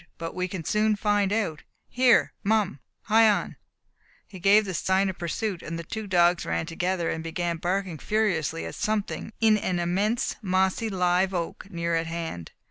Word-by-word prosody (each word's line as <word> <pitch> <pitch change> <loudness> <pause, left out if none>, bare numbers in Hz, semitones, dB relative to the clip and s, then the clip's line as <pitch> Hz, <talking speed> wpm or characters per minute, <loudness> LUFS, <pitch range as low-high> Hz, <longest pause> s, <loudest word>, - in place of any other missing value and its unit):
"But 165 0 -5
we 185 0 -2
can 185 -2 -6
soon 215 +5 +2
find 205 -1 +1
out. 200 -8 -1 0.3
Here, 250 -1 +3
Mum, 210 -8 +1 0.2
hie 225 0 +5
on!" 205 - 0 0.7
He 190 - -11
gave 205 +4 +5
the 190 - -4
sign 190 +3 +1
of 190 - -7
pursuit, 180 +2 -3
and 165 +1 -5
the 170 - -5
two 220 +5 -6
dogs 175 -2 +3
ran - - -2
together, 175 +1 -1
and 160 - -4
began 170 +1 -2
barking 180 -1 -2
furiously 185 - 0
at 80 - -6
something 215 0 -2
in 220 -2 +4
an 185 -2 -1
immense 195 +7 0
mossy 190 +2 +1
live 185 0 +1
oak 175 +3 -4
near 170 -2 -2
at 165 0 0
hand. 165 - -5
185 Hz, 175 wpm, -26 LUFS, 170-210 Hz, 0.7 s, hie